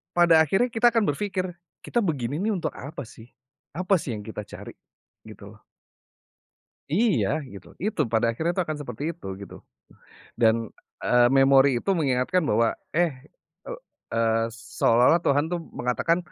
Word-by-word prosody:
pada 170 -2 +6
akhirnya 195 - +2
kita 230 +1 +4
akan 230 -2 +1
berpikir, 190 +3 -2 0.4
"Kita 240 - -1
begini 145 - -2
nih 220 +2 0
untuk 180 - -3
apa 140 0 -8
sih, 115 +1 -15 0.5
apa 185 +3 +2
sih 125 -7 -4
yang 105 - -7
kita 110 -1 -6
cari?" - - -10 0.5
Gitu - - -13
loh. - - -14 1.3
Iya 185 - +2 0.2
gitu. 100 -2 -12 0.2
Itu 210 -4 -2
pada 115 +1 +2
akhirnya 165 +8 -1
tuh 185 - +1
akan 155 -1 -4
seperti 125 -2 -8
itu 170 - -13
gitu 100 - -10 0.9
dan, 110 -1 +5 0.5
eee, 125 0 +4
memori 135 0 +6
itu - - -1
mengingatkan 140 +5 +1
bahwa, 115 +2 +3 0.3
eh, 175 -1 +3 0.6
eee - - -6 0.4
eee, 115 0 +2 0.3
seolah-olah 125 +9 +4
Tuhan 145 +1 +3
tuh 175 - -1 0.2
mengatakan 145 +7 +1
145 Hz, 150 wpm, -25 LUFS, 120-185 Hz, 1.3 s, pada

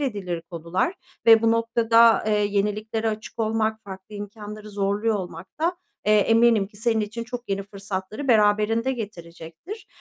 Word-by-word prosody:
edilir 195 -11 -3
konular. 170 - -1 0.3
Ve 225 -1 +8
bu 225 - +4
noktada, 230 0 +4
eee, 215 - +2
yeniliklere 210 +2 -1
açık 215 +1 -6
olmak, 220 0 0
farklı 190 +2 -10
imkânları 210 +1 -8
zorluyor 205 +2 0
olmak 180 -3 -6
da, 345 +3 +1 0.3
eee, 210 - +5
eminim 225 0 +4
ki 205 - -19
senin 225 +1 +1
için 215 +2 -4
çok 245 0 -7
yeni 195 0 -1
fırsatları 200 +5 -6
beraberinde 220 +2 +3
getirecektir. 195 - -8
215 Hz, 145 wpm, -24 LUFS, 200-230 Hz, 0.3 s, Ve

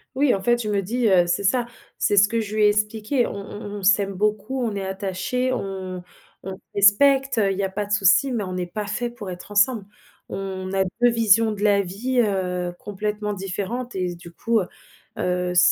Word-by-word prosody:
Oui, 275 -1 +3
en 195 - -2
fait, 240 +4 +3
je 215 - -3
me 200 -1 +1
dis, 235 +5 0
heu 180 -3 +4
c'est 175 +3 0
ça, 240 +4 +1 0.3
c'est 205 - +1
ce 200 +1 +7
que 230 +2 -1
je 215 0 -5
lui 215 - +3
ai 210 - +7
expliqué, 215 +4 0
on - - -6
on 200 +1 -8 0.2
on - - -10
s'aime 200 0 +3
beaucoup, 215 +6 -1
on 220 -3 -2
est 200 - -3
attachés, 195 +7 -2
on 190 -5 -4
on - - -13 0.4
on 190 0 -6 0.2
respecte, 270 +7 +4
heu, 200 -3 +3
il 190 - -3
y - - +1
a 195 - 0
pas 205 +2 -3
de 205 - -11
soucis, 210 +6 +4
mais 230 -4 -1
on 185 - -5
n'est 180 -1 -2
pas 210 +4 -5
faits 235 +3 -3
pour 210 -5 -8
être 180 +3 -9
ensemble. 210 +1 +2 0.4
On 190 -1 -5
a 195 0 +2 0.2
2 245 - +6
visions 225 -1 +4
de 205 -1 -6
la 205 -1 +4
vie, 220 +8 -2
heu, 180 -4 -1
complètement 210 +1 -3
différentes 200 +6 -4
et 185 -1 -1
s 175 - -9
du 170 0 -12
coup, 230 +6 0
heu 180 - -5 0.5
heu, 180 0 -1
ç - - +3
205 Hz, 230 wpm, -23 LUFS, 190-230 Hz, 0.5 s, ce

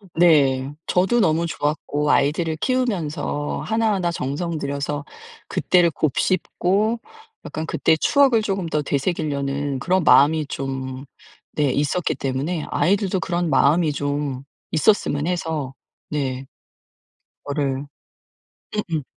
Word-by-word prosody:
네 140 -5 +4
저도 190 +7 +2
너무 165 -3 +2
좋았고 150 -2 -1
아이들을 155 +3 +1
키우면서 165 - -1
하나하나 210 -6 +1
정성 165 +3 -3
들여서 145 0 -3 0.4
그때를 175 -2 +3
곱씹고 185 - 0 0.5
약간 155 - -4
그때 160 0 +2
추억을 260 - +3
조금 195 -4 -2
더 150 -2 0
되새기려는 140 -2 -1
그런 185 +5 +1
마음이 155 +1 +5
좀 135 -1 -5 0.5
네 150 - +2
있었기 150 +6 0
때문에 140 +5 -2
아이들도 195 0 +1
그런 175 -3 -1
마음이 150 +4 +3
좀 145 -2 -2 0.3
있었으면 155 -3 +2
해서 160 -6 -2 0.3
네. 135 -3 -3 1.0
그거를 140 -1 -2 0.9
응응. 165 -9 -2
155 Hz, 255 characters per minute, -22 LUFS, 140-180 Hz, 1.0 s, 마음이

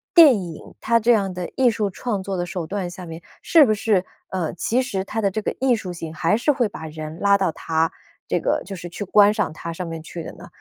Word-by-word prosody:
电 325 -6 +9
影 170 -3 -8 0.2
它 230 0 +3
这 235 +3 +4
样 200 -5 +2
的 180 -1 -4
艺 260 -2 +5
术 220 -3 -1
创 205 -1 -3
作 190 -1 -3
的 175 - -1
手 175 -1 -4
段 190 +1 -3
下 180 +1 -9
面， 165 0 -8 0.2
是 320 -4 +6
不 215 - +2
是， 205 -3 +1 0.3
呃， 180 -4 -2
其 245 +7 +1
实 195 -7 -2
它 220 +3 -3
的 200 - +2
这 215 +3 -3
个 - - -1
艺 260 -2 +3
术 195 -5 -5
性 165 -2 -7
还 165 +6 +2
是 270 +5 +2
会 250 -4 +1
把 160 -5 -8
人 155 +1 -7
拉 200 +1 +4
到 190 -4 +1
它 160 0 0 0.4
这 - - +1
个 - - 0
就 195 - -6
是 175 0 -7
去 175 - -5
观 205 +1 +5
赏 210 -8 -1
它 165 +1 -6
上 180 +2 -5
面 165 -1 -6
去 165 +1 -7
的 - - -7
呢？ - - -12
195 Hz, 275 characters per minute, -22 LUFS, 170-220 Hz, 0.4 s, 电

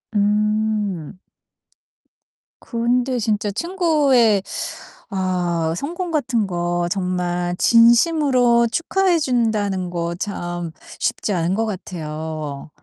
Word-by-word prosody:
음. 210 -4 0 1.4
근데 245 +2 0
진짜 210 -2 0
친구의 285 - +2 0.7
아 180 -4 -1
성공 345 - -4
같은 255 -9 0
거 175 -1 -1
정말 180 -2 -1
진심으로 240 - +4
축하해 360 +2 +1
준다는 215 - 0
거 170 -1 -3
참 175 -5 -4 0.3
쉽지 - - -1
않은 175 0 0
것 225 +2 0
같아요. 155 -7 -5
210 Hz, 170 characters per minute, -21 LUFS, 175-245 Hz, 1.4 s, 진심으로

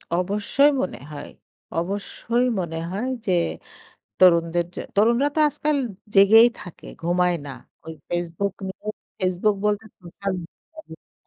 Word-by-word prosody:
অবশ্যই 205 +10 +2
মনে - - -4
হয়। 145 -1 -7 0.5
অবশ্যই 205 +6 -2
মনে 165 -2 -3
হয় 210 +7 -2 0.2
যে, 190 - +1 0.9
তরুণদের 170 -1 +4
যে - - -5 0.2
তরুণরা 235 +7 +4
তো - - +3
আজকাল 300 +1 -1 0.4
জেগেই 215 +4 +8
থাকে, 175 - -11 0.2
ঘুমায় 175 +1 +2
না। - - -6 0.3
ওই 160 - -7 0.2
Facebook 175 +3 -2
নিয়ে। 200 +2 -9 0.3
Facebook 185 +3 +1
বলতে 210 +1 +1 0.2
সোশ্যাল 190 +2 -5
মিডিয়া 315 - -15
195 Hz, 125 wpm, -23 LUFS, 175-220 Hz, 0.9 s, জেগেই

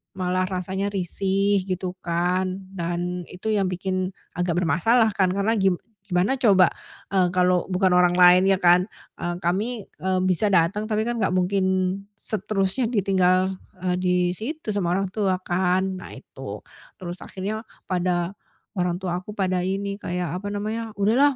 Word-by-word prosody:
malah 185 0 0
rasanya 190 +1 -2
risih 195 +1 +1
gitu 185 -1 -2
kan, 180 +2 0 0.2
dan 175 0 -2
itu 180 +4 -7
yang 200 -3 +2
bikin 185 0 -2 0.3
agak 175 -1 0
bermasalah 220 +8 +3
kan, 190 -2 +3
karena 200 +3 +1
gim 190 -2 +3 0.3
gimana 185 +8 +1
coba, 195 -7 +5 0.4
eee, 185 -2 +4
kalau 180 -1 +3
bukan 185 0 +2
orang 180 0 +4
lain 180 +1 +7
ya 195 - +5
kan, 175 +1 +5 0.3
eee, 175 0 -2
kami, 205 +6 -1
eee, 185 0 0
bisa 185 +3 +2
datang, 185 +5 +2
tapi 215 -1 0
kan 240 +1 -2
nggak 200 - +1
mungkin 185 +1 +1 0.5
seterusnya 215 +2 -1
ditinggal, 185 -2 +3 0.3
eee, 180 -1 +1
di 180 0 +1 0.2
situ 235 - -5
sama 185 -4 0
orang 195 0 -1
tua 195 -3 +1
kan, 185 +1 +1
nah - - -10
itu. - - -9 0.4
Terus 175 0 -5
akhirnya 205 +3 -4 0.3
pada 180 -1 0 0.5
orang 180 0 0
tua 180 -2 -1
aku 200 +3 -9
pada 185 -3 0
ini 200 +1 -2
kayak 180 -2 -3
apa 205 - -6
namanya, 220 +2 -3
"Udahlah, 255 +8 +4
185 Hz, 155 wpm, -24 LUFS, 180-200 Hz, 0.5 s, lain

